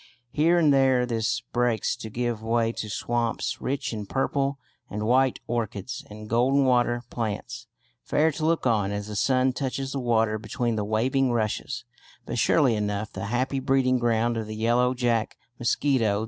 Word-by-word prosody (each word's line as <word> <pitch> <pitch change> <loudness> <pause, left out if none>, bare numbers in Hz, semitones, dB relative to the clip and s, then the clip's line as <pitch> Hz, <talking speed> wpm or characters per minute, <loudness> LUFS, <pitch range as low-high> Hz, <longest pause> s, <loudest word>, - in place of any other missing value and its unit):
Here 165 +4 +3
and 155 -4 +4
there 130 -2 +4
this 115 -3 -1
breaks 120 -2 +1
to 110 - -7
give 120 0 -2
way 115 0 +1
to 110 -2 -5
swamps, 120 +2 -2
rich 135 -2 -2
in 105 -2 -5
purple 135 +2 0 0.3
and 105 +1 -3
white 130 +2 +3
orchids 120 +2 -3
and 105 0 -9
golden 130 +5 +3
water 120 -1 +2
plants, 115 +1 -4 0.3
fair 160 +2 +2
to 155 - -6
look 165 -3 +1
on 105 -5 +2
as 105 +1 -4
the 105 - -5
sun 130 +4 +2
touches 135 0 -3
the 140 - -2
water 115 -3 +1
between 115 +2 -2
the 105 - -1
waving 125 +5 +1
rushes, 110 -3 -2 0.4
but - - -3
surely 140 -7 +4
enough 105 0 -2
the - - -5
happy 130 +5 -1
breeding 130 -1 +2
ground 120 0 +1
of 110 -1 -3
the 110 - -6
"Yellow 120 +3 +2
Jack" 120 -3 0 0.2
mosquito. 120 -4 +1
120 Hz, 170 wpm, -26 LUFS, 110-130 Hz, 0.4 s, and